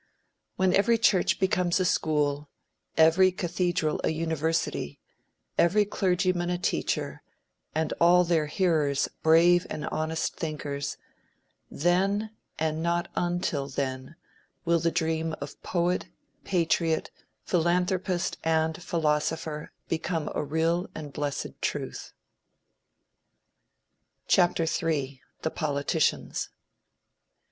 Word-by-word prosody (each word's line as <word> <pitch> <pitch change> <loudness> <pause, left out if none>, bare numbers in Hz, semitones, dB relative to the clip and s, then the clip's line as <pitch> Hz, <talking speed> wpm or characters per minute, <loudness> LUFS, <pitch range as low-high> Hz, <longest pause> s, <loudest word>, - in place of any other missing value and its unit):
When 185 -1 +2
every 230 +4 +4
church 200 -5 +3
becomes 180 -1 +2
a 185 - +1
school, 150 -3 0 0.5
every 165 +4 +6
cathedral 175 -3 -1
a - - +2
university, 160 - -1 0.6
every 205 +5 +4
clergyman 185 -2 0
a 180 - 0
teacher, 180 - -2 0.5
and 160 0 0
all 175 +1 +6
their 165 -3 +1
hearers 150 -4 +1
brave 170 +2 +5
and 150 - -4
honest 160 +1 -2
thinkers, 145 -3 -4 0.7
then, 195 +6 +1 0.3
and 160 0 -1
not 170 +1 0
until 175 -5 -1
then, 130 +1 -4 0.5
will 170 0 +3
the 165 +1 +1
dream 160 -1 -1
of 145 +1 -8
poet, 175 0 0 0.4
patriot, 165 -3 +1 0.3
philanthropist 180 +1 0
and 160 0 +1
philosopher, 155 -2 -1 0.2
become 165 -1 -2
a - - -1
real 165 +4 0
and 150 -3 -7
blessed 145 0 -4
truth. - - -3 2.2
III. 160 -6 +1 0.2
THE 160 - 0
POLITICIANS. 145 0 -1
165 Hz, 100 wpm, -27 LUFS, 155-175 Hz, 2.2 s, every